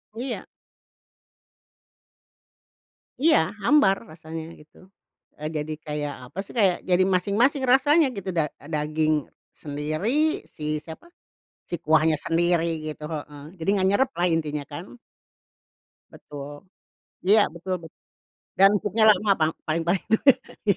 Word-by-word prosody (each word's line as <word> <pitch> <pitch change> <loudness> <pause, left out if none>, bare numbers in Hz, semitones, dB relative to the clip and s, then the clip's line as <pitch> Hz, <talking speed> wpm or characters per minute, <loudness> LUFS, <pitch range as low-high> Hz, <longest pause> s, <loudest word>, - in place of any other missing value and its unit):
Iya. 245 +1 -5 2.7
Iya, 260 - +3
hambar 285 -10 +5 0.2
rasanya, 160 0 -8
gitu. 170 +5 -19 0.5
Eee, 155 +1 -3
jadi, 155 -1 -4
kayak, 150 -2 -4 0.2
apa 185 - -8
sih, - - -13
kayak 195 -7 +2
jadi 185 0 +3
masing-masing 205 +9 +2
rasanya 280 +5 +4
gitu, 195 -3 -6
da 155 -3 0 0.2
daging 155 -1 0 0.3
sendiri, 200 - -1
si 150 0 -4
siapa, 165 - -11 0.6
si 175 - -5
kuahnya 155 +1 +3
sendiri, 170 -1 +1
gitu 155 0 -6
heeh, 150 -2 -7 0.2
jadi 165 - -6
enggak 190 -2 +2
nyerep 260 +6 +2
lah, 175 - +1
intinya 150 -3 -1
kan. 145 - -7 1.3
Betul. 145 -1 -9 0.8
Iya, 210 +2 +7
betul 180 +2 -4
betul, 160 - -14 0.6
dan 195 +1 +8
empuknya 215 +2 +1
lama 210 0 +2
pang 155 0 +2
paling-paling 170 +3 0
itu 220 - +5 0.5
iya, 200 - +4
170 Hz, 120 wpm, -25 LUFS, 155-205 Hz, 2.7 s, dan